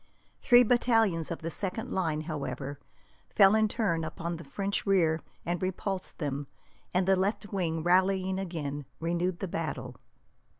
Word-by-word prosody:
Three 245 Hz, -1 st, +7 dB
battalions 225 Hz, -8 st, +2 dB
of 170 Hz, -, -5 dB
the 165 Hz, -, -2 dB
second 205 Hz, +7 st, -3 dB
line, 160 Hz, -5 st, 0 dB
however, 145 Hz, -2 st, -4 dB, 0.5 s
fell 195 Hz, -1 st, +6 dB
in 220 Hz, 0 st, +4 dB
turn 200 Hz, -7 st, 0 dB
upon 170 Hz, +1 st, -4 dB
the 165 Hz, -, -9 dB
French 200 Hz, +2 st, -2 dB
rear 165 Hz, -5 st, +3 dB, 0.2 s
and 175 Hz, 0 st, -1 dB
repulsed 190 Hz, +1 st, -3 dB
them, 145 Hz, -2 st, -3 dB, 0.4 s
and 180 Hz, +1 st, +1 dB
the 190 Hz, -, +5 dB
left 200 Hz, +2 st, -1 dB
wing, 165 Hz, -4 st, -1 dB
rallying 190 Hz, +1 st, +2 dB
again, 150 Hz, -6 st, -4 dB
renewed 170 Hz, +2 st, -1 dB
the 195 Hz, -, -1 dB
battle. 165 Hz, -2 st, -4 dB
180 Hz, 145 wpm, -29 LUFS, 165-195 Hz, 0.5 s, Three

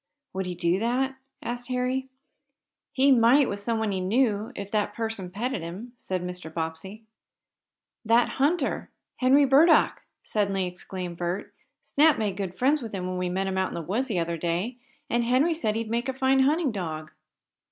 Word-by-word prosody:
"Would 190 Hz, 0 st, -3 dB
he 180 Hz, -, -4 dB
do 175 Hz, +2 st, +1 dB
that?" 260 Hz, +4 st, 0 dB, 0.3 s
asked 245 Hz, +1 st, -4 dB
Harry. 255 Hz, +1 st, -1 dB, 0.8 s
"He 275 Hz, +1 st, +4 dB
might 255 Hz, +3 st, +5 dB
with 200 Hz, -, -3 dB
someone 220 Hz, 0 st, -1 dB
he 190 Hz, -1 st, -1 dB
knew, 215 Hz, +2 st, +1 dB
if 200 Hz, 0 st, -6 dB
that 210 Hz, -2 st, 0 dB
person 225 Hz, -5 st, -3 dB
petted 220 Hz, +3 st, -3 dB
him," 190 Hz, +9 st, -7 dB
said 185 Hz, -6 st, -4 dB
Mr. 180 Hz, -2 st, -6 dB
Bobbsey. 165 Hz, +6 st, -5 dB, 1.0 s
"That 230 Hz, +2 st, +4 dB
hunter 295 Hz, 0 st, +1 dB, 0.3 s
Henry 270 Hz, +3 st, +5 dB
Burdock!" 290 Hz, +5 st, +5 dB, 0.2 s
suddenly 195 Hz, -3 st, 0 dB
exclaimed 180 Hz, -1 st, -6 dB
Bert. 175 Hz, +3 st, -3 dB, 0.3 s
"Snap 305 Hz, +1 st, +4 dB
made 210 Hz, -4 st, -1 dB
great 190 Hz, -2 st, -4 dB
friends 280 Hz, +6 st, +2 dB
with 225 Hz, -4 st, -6 dB
him 185 Hz, -1 st, -3 dB
when 185 Hz, 0 st, -3 dB
we 180 Hz, 0 st, -1 dB
met 190 Hz, +2 st, -1 dB
him 190 Hz, 0 st, -1 dB
out 190 Hz, -, +1 dB
in -, -, -7 dB
the 170 Hz, -, -3 dB
woods 225 Hz, -, -1 dB
the 215 Hz, -8 st, -1 dB
other 170 Hz, 0 st, -1 dB
day, 175 Hz, +9 st, -2 dB, 0.3 s
and 235 Hz, 0 st, +1 dB
Henry 260 Hz, +8 st, +3 dB
said 220 Hz, -9 st, -1 dB
he'd 225 Hz, 0 st, -2 dB
make 240 Hz, +3 st, -1 dB
a -, -, -1 dB
fine 265 Hz, 0 st, +2 dB
hunting 290 Hz, +2 st, +3 dB
dog." 155 Hz, -6 st, -5 dB
220 Hz, 180 wpm, -26 LUFS, 185-255 Hz, 1.0 s, might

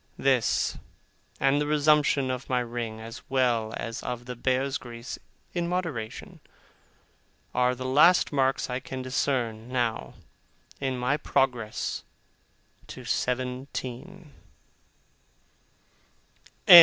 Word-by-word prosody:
This, 130 Hz, -4 st, +2 dB, 0.6 s
and 135 Hz, +2 st, +3 dB
the 145 Hz, -, 0 dB
resumption 150 Hz, -3 st, +3 dB
of 130 Hz, +1 st, -5 dB
my 125 Hz, -1 st, +2 dB
ring, 120 Hz, -2 st, -4 dB
as 115 Hz, +1 st, -8 dB
well 120 Hz, -4 st, +2 dB
as 115 Hz, 0 st, -4 dB
of 120 Hz, -1 st, -4 dB
the 125 Hz, 0 st, -5 dB
bear's 130 Hz, +3 st, 0 dB
grease 120 Hz, 0 st, -7 dB, 0.3 s
in 175 Hz, -1 st, 0 dB
moderation, 165 Hz, -12 st, -3 dB, 1.1 s
are 125 Hz, 0 st, +3 dB
the 130 Hz, +1 st, -6 dB
last 155 Hz, +8 st, +5 dB
marks 135 Hz, -2 st, +2 dB
I 125 Hz, 0 st, -2 dB
can 130 Hz, 0 st, -6 dB
discern, 125 Hz, -3 st, -1 dB
now, 120 Hz, -3 st, -1 dB, 0.6 s
in 130 Hz, -2 st, -1 dB
my 125 Hz, +4 st, +1 dB
progress 125 Hz, -6 st, 0 dB, 0.8 s
to -, -, -9 dB
seventeen. 130 Hz, +6 st, -3 dB
130 Hz, 105 wpm, -27 LUFS, 120-140 Hz, 1.1 s, last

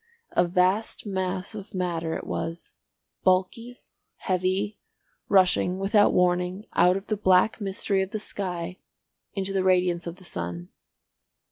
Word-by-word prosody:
A 175 Hz, -, +2 dB
vast 185 Hz, +6 st, +1 dB
mass 190 Hz, -1 st, -2 dB
of 205 Hz, -1 st, -9 dB
matter 170 Hz, -3 st, -1 dB
it -, -, -5 dB
was, 165 Hz, +1 st, -5 dB, 0.5 s
bulky, 225 Hz, +7 st, 0 dB, 0.3 s
heavy, 190 Hz, +3 st, -1 dB, 0.5 s
rushing 185 Hz, -1 st, +4 dB
without 205 Hz, +2 st, +4 dB
warning 180 Hz, +2 st, +1 dB
out 180 Hz, +1 st, +4 dB
of 195 Hz, -, -7 dB
the 215 Hz, -, -1 dB
black 190 Hz, +2 st, +3 dB
mystery 195 Hz, 0 st, 0 dB
of 190 Hz, -, -2 dB
the 215 Hz, -, -4 dB
sky 180 Hz, -3 st, -5 dB, 0.5 s
into 195 Hz, -1 st, -3 dB
the 190 Hz, -1 st, +1 dB
radiance 180 Hz, -2 st, +2 dB
of 170 Hz, -, -5 dB
the 185 Hz, -, -16 dB
sun. 85 Hz, -, -5 dB
185 Hz, 135 wpm, -26 LUFS, 180-195 Hz, 0.5 s, rushing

